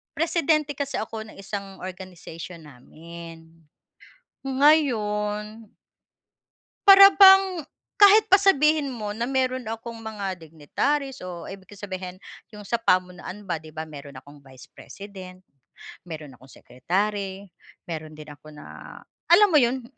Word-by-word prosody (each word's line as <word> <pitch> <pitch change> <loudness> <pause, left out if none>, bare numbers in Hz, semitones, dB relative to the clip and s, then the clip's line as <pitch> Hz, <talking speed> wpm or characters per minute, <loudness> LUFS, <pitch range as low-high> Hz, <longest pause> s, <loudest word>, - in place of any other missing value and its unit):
presidente 310 -2 0
kasi 280 -1 -4
ako 220 0 -5
ng - - -14
isang 195 0 -7
organization 180 -2 -10
namin 165 +4 -13 1.0
ngayon 220 -7 +1 1.2
Para 395 0 +10
bang 385 -5 +6 0.3
kahit 420 +1 +6
pa 390 - +7
sabihin 305 -6 +3
mo 220 -6 -5
na 230 +3 -4
meron 260 -2 -1
akong 225 +1 -7
mga 205 -5 -6
dignitaries, 255 - -3
o 180 -2 -8
ibig 190 -1 -12
kong 205 0 -15
sabihin 185 -2 -6 0.4
yung 210 - -10
sa 230 +4 -2
pamunuan 185 -1 -1
ba, 170 -5 -4
'di 155 0 -15
ba 160 - -4
meron 145 -2 -11
akong 145 +2 -14
Vice 135 -2 -17
President, 185 -2 -12 0.6
meron 155 -4 -8
akong 130 - -17
Secretary, 195 +9 -4 0.3
meron 155 -2 -8
din 150 0 -11
ako 150 +1 -15
na, - - -12 0.6
alam 405 +3 +6
mo 305 - +6
'yon? 250 0 0
205 Hz, 130 wpm, -24 LUFS, 170-265 Hz, 1.2 s, Para